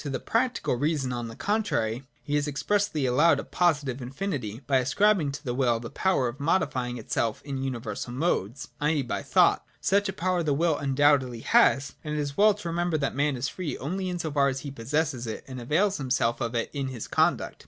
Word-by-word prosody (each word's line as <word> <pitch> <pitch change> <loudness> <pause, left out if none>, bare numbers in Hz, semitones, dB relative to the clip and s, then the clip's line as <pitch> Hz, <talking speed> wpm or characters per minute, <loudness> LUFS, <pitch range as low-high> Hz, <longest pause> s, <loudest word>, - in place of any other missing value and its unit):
To 145 - -5
the 130 -2 -2
practical 235 - 0
reason, 145 -2 0
on 120 -1 -3
the 115 - -9
contrary, 135 - -1 0.2
he 145 - -4
has 145 0 +1
expressly 155 +1 0
allowed 145 +4 +4
a - - -4
positive 145 -7 0
infinity, 130 - -4
by 135 0 +3
ascribing 155 +5 +2
to 145 - -7
the 120 - -1
will 120 -3 +2
the 115 0 -8
power 185 -10 +1
of 120 +4 -6
modifying 130 -6 0
itself 115 0 -1
in 135 -2 -4
universal 120 -3 -4
modes, 130 - -1
i. 150 - +1
e. 155 -2 +1
by 120 - -3
thought. - - +3 0.2
Such 200 +1 +2
a - - -3
power 180 0 0
the 150 -4 +1
will 165 +1 +2
undoubtedly 135 -4 +2
has: 140 +4 +3
and 150 0 -3
it - - -1
is 145 -1 -3
well 210 0 +5
to 210 -4 -7
remember 170 -1 0
that 140 -2 -1
man 145 +1 +1
is 125 +3 -1
free 180 -5 -4
only 185 +6 -3
in 180 - -3
so 160 -3 -3
far 140 -1 +3
as 135 -1 -2
he 140 - -6
possesses 135 0 -2
it 110 - -5
and 130 -2 -7
avails 185 - +1
himself 125 -4 0
of 120 0 -2
it 115 - -1
in 140 -2 -2
his 125 -4 -6
conduct. - - +1
140 Hz, 215 wpm, -27 LUFS, 125-165 Hz, 0.2 s, well